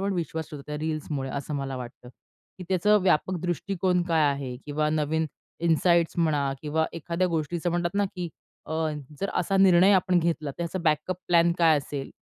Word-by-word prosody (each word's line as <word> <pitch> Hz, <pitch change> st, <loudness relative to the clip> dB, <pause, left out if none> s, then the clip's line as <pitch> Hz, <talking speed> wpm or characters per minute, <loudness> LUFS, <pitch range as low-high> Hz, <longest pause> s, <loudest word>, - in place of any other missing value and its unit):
पण 200 Hz, +1 st, 0 dB
विश्वास 160 Hz, -2 st, -3 dB
ठेवतायेत 150 Hz, 0 st, -6 dB
रील्समुळे 155 Hz, -3 st, -3 dB
असं 140 Hz, +2 st, -4 dB
मला 135 Hz, -2 st, -3 dB
वाटतं, 125 Hz, 0 st, -9 dB, 0.5 s
की 180 Hz, -, -7 dB
त्याचं 210 Hz, +3 st, +4 dB
व्यापक 185 Hz, 0 st, +2 dB
दृष्टीकोन 180 Hz, +1 st, 0 dB
काय 160 Hz, -2 st, +3 dB
आहे? 135 Hz, -3 st, -5 dB
किंवा 150 Hz, +1 st, 0 dB
नवीन 155 Hz, +1 st, 0 dB, 0.4 s
इनसाईट्स 170 Hz, +1 st, +3 dB
म्हणा 145 Hz, -4 st, +1 dB
किंवा 160 Hz, +1 st, 0 dB
एखाद्या 170 Hz, +2 st, -1 dB
गोष्टीचं 170 Hz, +1 st, -1 dB
म्हणतात 175 Hz, +1 st, -1 dB
ना, 205 Hz, 0 st, +2 dB
की 180 Hz, -3 st, -5 dB, 0.4 s
अ, -, -, -5 dB, 0.5 s
जर 195 Hz, -, -1 dB
असा 195 Hz, +2 st, +1 dB
निर्णय 190 Hz, 0 st, +6 dB
आपण 185 Hz, -1 st, +3 dB
घेतला, 165 Hz, -3 st, -1 dB
तर -, -, -11 dB
त्याचा 170 Hz, +2 st, -3 dB
बॅकअप 155 Hz, +3 st, +1 dB
प्लॅन 170 Hz, 0 st, +4 dB
काय 165 Hz, -2 st, +5 dB
असेल? 140 Hz, -1 st, -6 dB
165 Hz, 170 wpm, -26 LUFS, 150-180 Hz, 0.5 s, निर्णय